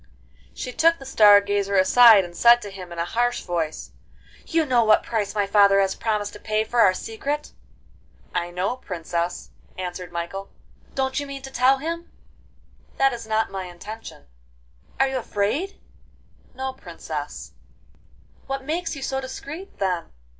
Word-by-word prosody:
She 250 - -5
took 330 +3 +4
the 270 - -12
Star 210 -6 +7
Gazer 200 0 -1
aside, 200 +1 +7
and 175 0 -11
said 235 +4 +6
to 205 - -7
him 185 -2 -9
in 170 - -8
a 170 - -1
harsh 240 +6 0
voice: 165 -3 -3 0.6
'You 325 -1 +1
know 250 -4 +3
what 215 -1 +4
price 215 -3 -2
my 205 -1 +2
father 200 0 +5
has 195 -1 +2
promised 210 -2 -2
to 210 - -10
pay 215 0 0
for 235 +2 -2
our 190 -4 +5
secret?' 285 +10 -4 0.8
'I 175 - -1
know, 185 +7 -2
Princess,' 175 -5 -4 0.3
answered 180 -1 -5
Michael. 175 +3 -5 0.5
'Don't 265 0 0
you 285 - -5
mean 275 -1 -7
to 270 - -8
tell 260 +2 +4
him?' 335 +4 -5 0.9
'That 270 -1 +3
is 230 -2 -7
not 220 0 0
my 190 -1 -4
intention.' 180 - -10 0.7
'Are 270 - +4
you 265 0 -2
afraid?' 255 - -2 0.8
'No, 265 0 -3
Princess.' 265 - -7 0.9
'What 270 0 -4
makes 330 +2 -2
you 275 - -7
so 265 0 -2
discreet, 285 +8 -8
then? 185 -3 -1
220 Hz, 160 wpm, -24 LUFS, 195-265 Hz, 0.9 s, Star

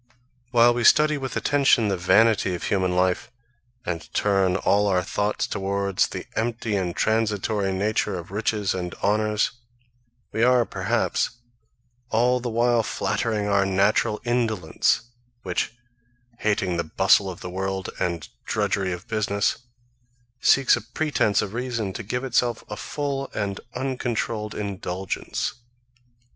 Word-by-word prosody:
While 120 -1 +5
we 120 0 -1
study 150 +4 +5
with 135 -1 -4
attention 135 -6 +3
the 100 - +1
vanity 100 +1 +3
of 85 - -7
human 95 -2 0
life, 90 0 +1 0.6
and 85 -2 -4
turn 95 -3 +2
all 100 +2 +2
our 90 -2 +2
thoughts 105 +2 -1
towards 100 0 0
the - - -6
empty 115 -1 -1
and 90 -3 -1
transitory 105 -2 0
nature 100 0 0
of 85 +1 -9
riches 105 -1 0
and 90 -2 -4
honours, 105 +1 +2 0.8
we 110 - -2
are, 125 0 +5
perhaps, - - 0 0.8
all 125 +3 +2
the 125 0 -3
while 120 +1 +3
flattering 110 0 -1
our 100 -1 +3
natural 100 +2 +2
indolence, 115 -10 +1 0.4
which, 90 -2 -1 0.7
hating 100 -4 0
the 85 - 0
bustle 95 +4 +3
of 90 - -8
the 90 - -6
world, 95 0 -3
and 85 -2 -2 0.2
drudgery 95 -2 0
of 90 +5 -6
business, 100 -3 0 0.8
seeks 135 +1 +5
a - - -5
pretence 120 -3 0
of 105 0 -6
reason 120 -5 -2
to 115 - -5
give 125 +5 -3
itself 120 -2 0
a 105 - -5
full 140 +2 -3
and 100 -2 -2 0.2
uncontrolled 120 -5 -2
indulgence. 95 -2 -3
105 Hz, 135 wpm, -24 LUFS, 95-115 Hz, 0.8 s, While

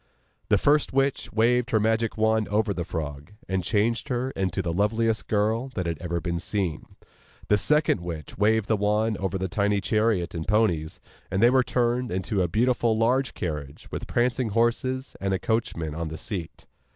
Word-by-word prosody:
The - - +5
first 145 -1 +2
witch 135 0 0
waved 120 +2 +2
her 110 - +3
magic 110 +1 0
wand 110 0 +2
over 105 0 +1
the 90 - -3
frog, 75 0 -6
and 95 -1 -1
changed 115 - 0
her 125 +1 -1
into 95 -2 -2
the 85 -1 -2
loveliest 110 +4 +1
girl 110 +5 0
that 90 - -2
had 85 -2 -3
ever 85 -1 -2
been 85 +1 -2
seen. 95 -3 -3 0.5
The 105 - +5
second 150 - +2
witch 80 -4 -6
waved 110 +1 +2
the 110 - +2
wand 105 +1 +1
over 95 -1 -1
the 95 0 -2
tiny 100 +2 +1
chariot 105 -3 +1
and 80 -1 -5
ponies, 90 -8 +1 0.3
and 95 - -1
they 120 +3 +6
were 130 0 +5
turned 125 -1 0
into 95 +2 -1
a 90 - +2
beautiful 115 +3 +1
large 125 +4 +1
carriage 75 -5 -5
with - - -5
prancing 120 0 +1
horses, 120 +4 0
and 95 -1 0
a - - 0
coachman 110 -9 -1
on 85 +1 -3
the 80 0 -6
seat. 85 0 -6
105 Hz, 185 wpm, -26 LUFS, 90-115 Hz, 0.5 s, they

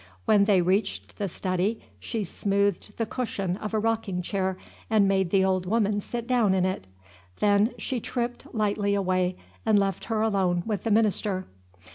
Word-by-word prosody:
When 205 -2 +5
they 195 -4 +4
reached 195 +5 -1
the 200 - 0
study, 185 +4 -1 0.2
she 225 -3 -3
smoothed 200 +2 -1
the 225 - 0
cushion 200 -6 -2
of 210 0 -5
a 220 - 0
rocking 215 -5 -1
chair, 190 0 -1 0.3
and 215 -3 +4
made 190 -2 +2
the 190 +1 +3
old 185 -1 0
woman 205 -1 +1
sit 235 +2 -5
down 235 -6 +3
in 185 -1 +2
it. 185 - -3 0.5
Then 205 +3 +3
she 255 - -2
tripped 240 +1 -4
lightly 205 -2 +1
away, 185 -2 0 0.3
and 220 -2 +4
left 195 -2 0
her 220 -2 -1
alone 190 -5 +1
with 215 -1 -3
the - - +1
minister. 205 -3 +1
200 Hz, 170 wpm, -26 LUFS, 190-220 Hz, 0.5 s, When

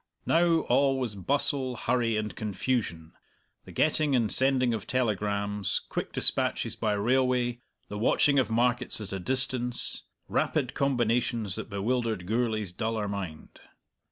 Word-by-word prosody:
Now 165 -1 +3
all 135 -2 +2
was 120 -5 -2
bustle, 130 +4 0
hurry, 120 -1 0
and 105 -1 -3
confusion, 105 -6 -2 0.5
the - - -11
getting 155 -2 +2
and 115 -4 +1
sending 130 -2 +3
of 110 -2 -4
telegrams, 105 -4 0
quick - - -3
dispatches - - 0
by 110 -2 0
railway, 120 +2 +1 0.3
the 105 - -6
watching 140 +5 +3
of 130 - +1
markets 120 +2 +1
at 105 -2 -6
a 95 - -3
distance, 125 +2 -1 0.3
rapid - - 0
combinations 120 -5 +1
that - - -5
bewildered 110 -1 -1
Gourlay's 110 -2 -1
duller 110 +2 -2
mind. 95 -6 -6
120 Hz, 130 wpm, -28 LUFS, 105-130 Hz, 0.5 s, Now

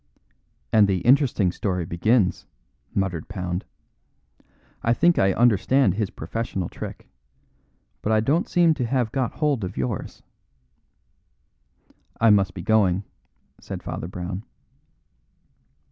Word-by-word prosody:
"And 105 -2 +6
the 95 -3 0
interesting 125 -8 +3
story 90 -2 -2
begins," 95 +4 +1 0.5
muttered 90 -5 -1
Pound. 90 -3 -4 1.2
"I 115 +1 +2
think 170 +6 +3
I 95 0 +4
understand 120 +1 +3
his 105 -1 -2
professional 95 +1 -4
trick. - - -8 0.9
But 110 - -1
I 110 - +4
don't 145 +10 +1
seem 170 -2 +4
to 135 -6 -2
have 120 -3 0
got 130 -2 -1
hold 145 -7 0
of 95 +1 -5
yours." 65 -1 -4 2.0
"I 115 -1 +5
must 95 -3 +3
be 90 - -6
going," 100 -4 +2 0.6
said - - -7
Father - - -5
Brown. 90 +2 -5
105 Hz, 115 wpm, -24 LUFS, 90-120 Hz, 2.0 s, And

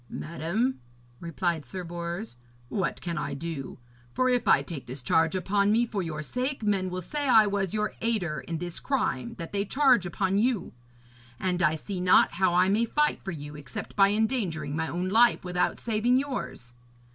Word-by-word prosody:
'Madam,' 170 +11 -2 0.4
replied 170 -1 -2
Sir 180 +9 -6
Bors, 170 - -5 0.3
'what 195 - -2
can 170 -1 -3
I - - -3
do? 155 -2 -5 0.4
For 255 0 +2
if 245 -2 +1
I - - +5
take 160 -7 -7
this 130 +1 -5
charge 160 +7 +2
upon 200 +2 +2
me 230 +2 +3
for 210 -4 -3
your 155 -3 -4
sake, 250 - -3
men 195 -3 +1
will 180 0 -4
say 290 - -2
I 220 -3 +7
was 200 -2 -1
your 215 0 -1
aider 195 -10 -1
in 165 - -2
this 175 +1 -5
crime 130 - -1
that 165 - -7
they 200 -1 0
charge 255 -4 +3
upon 190 +3 0
you. 235 -3 0 0.7
And 180 -1 -1
I 155 -1 +3
see 180 +4 -5
not 180 0 +5
how 175 0 +1
I 180 +1 +5
may 210 +4 +2
fight 300 +5 0
for - - -5
you 150 -4 -7
except 145 -4 -7
by 195 -1 +6
endangering 200 - -1
my 160 0 -1
own 175 +3 -2
life 230 -1 +4
without 180 0 0
saving 235 +2 +2
yours. 130 - -4
185 Hz, 185 wpm, -27 LUFS, 165-220 Hz, 0.7 s, I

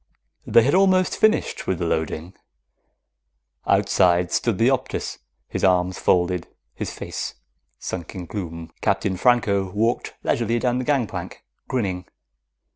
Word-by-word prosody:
_ - - -7
They 115 - +7
had 140 - +2
almost 185 -1 +4
finished 220 0 +1
with 95 - 0
the 85 - -2
loading. 80 +2 -2 1.3
Outside 90 -3 +3
stood 115 -5 +1
the 115 +5 +4
Optus, 135 - -2 0.3
his - - -4
arms 90 -1 +2
folded, 90 0 +1 0.3
his - - -4
face - - -5 0.4
sunk 85 -1 -6
in 90 -2 -5
gloom. 85 -4 -6
Captain 95 - +1
Franco 100 -3 +2
walked 110 +5 -1
leisurely 115 0 +1
down 125 +1 0
the 130 - -3
gangplank, 135 -6 -2 0.2
grinning. 95 -8 -2
100 Hz, 130 wpm, -23 LUFS, 90-120 Hz, 1.3 s, They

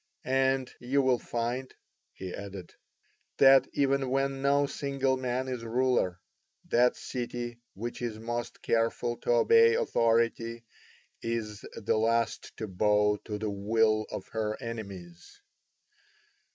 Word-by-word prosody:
And 130 0 +1
you 135 +3 +1
will 130 -2 +3
find," 120 +2 -3 0.4
he 95 -1 -7
added, 100 -3 -8 0.6
"that 135 -1 +7
even 140 -1 +1
when 135 +1 0
no 140 +1 +3
single 135 -1 -1
man 130 0 -2
is 125 -3 -4
ruler, 120 -6 +1 0.5
that 125 +1 +4
city 120 -1 -5 0.2
which 120 +5 -5
is 115 -3 -3
most 120 +1 -5
careful 115 +1 0
to - - -7
obey 460 -2 +6
authority 115 - +1 0.6
is 110 -3 -3
the 110 - 0
last 115 +1 0
to 110 - -4
bow 105 +2 +2
to 105 -2 -4
the 105 0 -3
will 110 +2 +2
of - - -6
her 110 -1 -2
enemies. 100 -7 -8
120 Hz, 125 wpm, -29 LUFS, 110-130 Hz, 0.6 s, that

